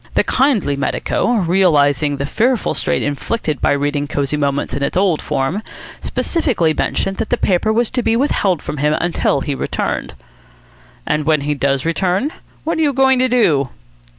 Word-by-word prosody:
The - - +4
kindly 250 - +1
medico, 165 - -1
realising 155 - +2
the 140 - -2
fearful 235 - +1
strain - - -1
inflicted 150 - -2
by - - +3
reading 145 0 -1
Cosy 145 -1 -1
Moments 140 -1 -1
in 140 - -2
its 140 - -1
old 185 -5 +2
form, 135 +10 -1 0.4
specifically 245 - 0
mentioned 195 +4 -1
that - - -3
the 245 - +1
paper 195 +2 +1
was 230 +1 +1
to 250 - 0
be 225 - +1
withheld 200 - +1
from 150 - -5
him 150 +2 +1
until 170 -5 0
he 145 - -2
returned." - - -3 0.9
"And 150 0 0
when 155 -2 +3
he 150 +1 -1
does 140 -1 0
return, 185 - 0 0.3
what 320 0 -1
are - - +2
you 290 -3 +2
going 265 -1 +3
to 255 0 +2
do?" 155 - +2
165 Hz, 175 wpm, -18 LUFS, 145-230 Hz, 0.9 s, The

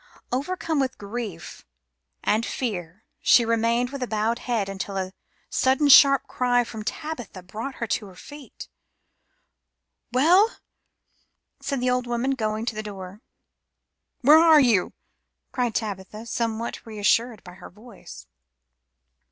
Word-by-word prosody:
Overcome 320 +4 -2
with 265 -1 -1
grief 205 -5 -7 0.6
and 215 +2 +1
fear 195 -7 -4 0.2
she 240 - +5
remained 230 +2 +1
with 265 -3 -4
bowed 220 +2 0
head 230 -5 -1
until 195 0 -5
a 190 0 -3 0.3
sudden 265 +3 +2
sharp 275 0 +7
cry 245 -1 +1
from 220 -2 -8
Tabitha 240 - -6
brought 220 +9 -6
her 235 - -3
to 210 -1 -2
her 185 - -14
feet. 290 +8 -12 1.4
"Well," 350 - +4 1.0
said 275 -3 -3
the 250 0 +1
old 250 -1 -1
woman, 240 +3 -1
going 220 -3 -2
to 225 - -2
the 215 - -3
door. 195 -1 -9 1.0
"Where 300 +5 +7
are 325 -2 +7
you?" 230 -9 +2 0.6
cried 245 -4 -1
Tabitha, 210 0 -4
somewhat 230 0 -3
reassured 220 +1 0
by 180 - -12
her 180 - -12
voice. 215 +3 -13
235 Hz, 125 wpm, -24 LUFS, 210-260 Hz, 1.4 s, sharp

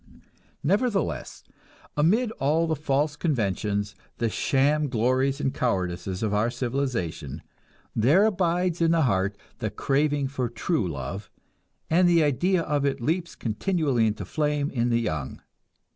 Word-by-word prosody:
Nevertheless, 200 - 0 0.5
amid 215 +11 +2
all 155 +4 +2
the 160 -1 0
false 145 +1 0
conventions, 105 - -1 0.2
the 115 -1 0
sham 145 +6 +2
glories 130 +3 +1
and 135 -2 -1
cowardices 95 - -2
of 105 -2 0
our 105 +3 +2
civilization, 115 - -3 0.5
there 145 - +5
abides 180 -3 +1
in 165 - +4
the 165 -1 +3
heart 100 -4 +1 0.2
the 110 - -1
craving 140 +6 0
for 130 -3 -2
true 120 - -1
love, 75 +7 -5 0.6
and 175 +2 +4
the 170 -2 +5
idea 170 +5 +2
of 145 -2 0
it 140 -1 0
leaps 165 +8 -1
continually 130 - 0
into 110 - -3
flame 150 -1 -1
in 120 -2 0
the 115 0 +2
young. 80 - -4
135 Hz, 135 wpm, -26 LUFS, 110-160 Hz, 0.6 s, there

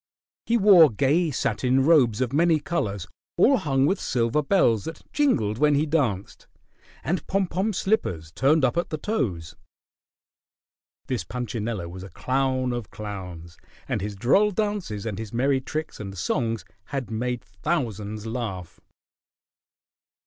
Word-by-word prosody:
He 235 - +3
wore 190 -7 +7
gay 145 - +2
satin 130 0 +1
robes 130 -9 +4
of 130 0 -1
many 165 +1 +3
colors 105 - -2 0.3
all 260 +10 +5
hung 135 -7 +1
with 190 +7 +1
silver 120 +4 +1
bells 140 - +2
that 160 -1 -7
jingled 115 - +1
when 150 -1 +4
he 145 +2 +2
danced, 130 - -1 0.6
and 170 -1 -2
pom 195 0 +1
pom 190 +5 -1
slippers 90 - -1
turned 140 - +3
up 130 - 0
at 170 - 0
the 155 - -3
toes. 110 - -2 1.5
This 130 -3 -2
Punchinello 115 -6 -4
was 90 +2 -9
a 95 - -9
clown 130 0 0
of 120 -4 -5
clowns, 90 -5 -8 0.3
and - - -1
his 105 +1 -4
droll 140 - +3
dances 205 - -2
and 105 -3 -4
his 110 -2 -6
merry 130 +3 +1
tricks 155 +4 -5
and 100 -2 -7
songs 115 +2 -1 0.2
had 135 -1 -5
made 120 +1 -2
thousands 105 - -3
laugh. 110 -7 -5
125 Hz, 140 wpm, -25 LUFS, 105-160 Hz, 1.5 s, wore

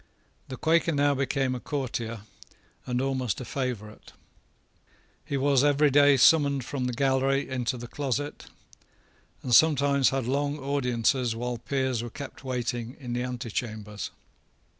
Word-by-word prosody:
The 130 - -7
Quaker 165 +1 +2
now 145 0 +3
became 135 -1 0
a 125 - -4
courtier, 115 -5 -4 0.7
and 125 -1 -1
almost 130 -5 -1
a 125 - -6
favourite. 115 -5 -5 1.1
He 140 - -3
was 140 -1 +3
every 145 0 +4
day 145 0 +6
summoned 140 -1 +4
from 130 -1 -3
the 125 - -2
gallery 135 +2 +1
into 125 0 -2
the 120 0 -7
closet, 145 +2 -3 1.0
and 125 - -1
sometimes 140 -1 +5
had 135 -2 -2
long 145 +3 -1
audiences 125 -3 0
while 120 0 -3
peers 130 -2 -1
were 120 - -5
kept 135 +3 -9
waiting 120 -1 -3
in 125 -4 -5
the 120 - -1
antechambers. 110 -4 -4
130 Hz, 140 wpm, -27 LUFS, 120-140 Hz, 1.1 s, day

